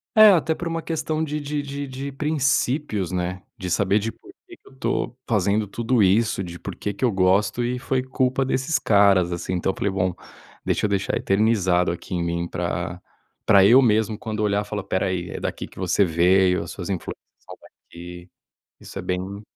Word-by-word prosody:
É, 215 -1 +9
até 160 -2 +2
por 175 - -5
uma 165 0 -2
questão 155 -1 -2
de 150 0 -3
de 145 0 -3
de 140 0 -5
de 135 +2 -6
princípios, 140 - 0
né. 90 0 -3
De 90 -1 -5
saber 100 +3 +2
de 110 +2 -3
por 370 - -17 0.2
que 350 - -13
que - - -26
eu 135 - -17
tô 130 - -2
fazendo 105 -1 +1
tudo 115 +3 0
isso, 100 +1 +2
de 85 -1 -8
por - - -7
que 105 - -4
que 125 +6 -1
eu 120 - +2
gosto, 100 +4 +2
e 125 +1 -1
foi 130 +1 -1
culpa 130 +1 0
desses 135 +3 0
caras, 100 -6 +4
assim. 85 +1 -3
Então, 90 +1 0
eu - - -11
falei: 100 - 0
"Bom, 95 -1 0 0.5
deixa - - 0
eu - - 0
deixar 100 -1 0
eternizado 95 -4 +2
aqui 85 +1 -6
em 85 - -1
mim 85 0 -2
pra - - -3 0.5
pra 100 -2 +6
eu 125 +6 +7
mesmo, 110 -2 +2
quando 110 -1 -5
olhar, 105 -1 +1
falar 105 -1 -4
espera 95 0 -1
aí, 90 -1 -3
é - - -5
daqui - - -4
que - - -15
você 95 +1 +2
veio, 90 +2 +3
as 85 - -8
suas 90 -2 -7
influências 95 -3 -6
são - - -10
daqui." 90 +1 -12 0.5
Isso - - -9
é - - -5
bem 95 +3 -4
105 Hz, 205 wpm, -23 LUFS, 90-130 Hz, 0.5 s, É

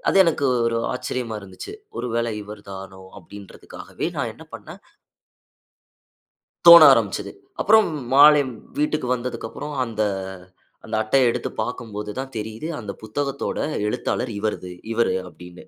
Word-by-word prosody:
அது - - +2
எனக்கு 155 -4 +1 0.2
ஒரு 115 0 0
ஆச்சரியமா 125 -3 -4
இருந்துச்சு. 95 -2 -10 0.2
ஒரு - - -3
வேளை 115 0 0
இவர் 105 0 -10
தானோ 95 0 -9 0.2
அப்படின்றதுக்காகவே 100 +2 -9
நான் - - -2
என்ன - - -14
பண்ணினேன் - - -11 1.9
தோண 170 -1 +12
ஆரம்பிச்சது. - - -1 0.3
அப்புறம் 220 0 +5 0.3
மாலை 145 +1 +8
வி - - -7 0.3
வீட்டுக்கு 150 -3 0
வந்ததுக்கப்புறம் 125 +4 -6
அந்த 115 -3 -4 1.0
அட்டைய 120 +3 +3
எடுத்து - - -2
பார்க்கும்போது 110 -3 -6
தான் 135 0 -5
தெரியுது 110 +7 -5
அந்த 105 -4 -6
புத்தகத்தோட 140 +6 -3 0.3
எழுத்தாளர் 120 +3 -2
இவரது 100 -4 -3 0.2
இவரு 115 -2 +1
அப்படின்னு 90 +1 -13
115 Hz, 125 wpm, -22 LUFS, 105-135 Hz, 1.9 s, தோண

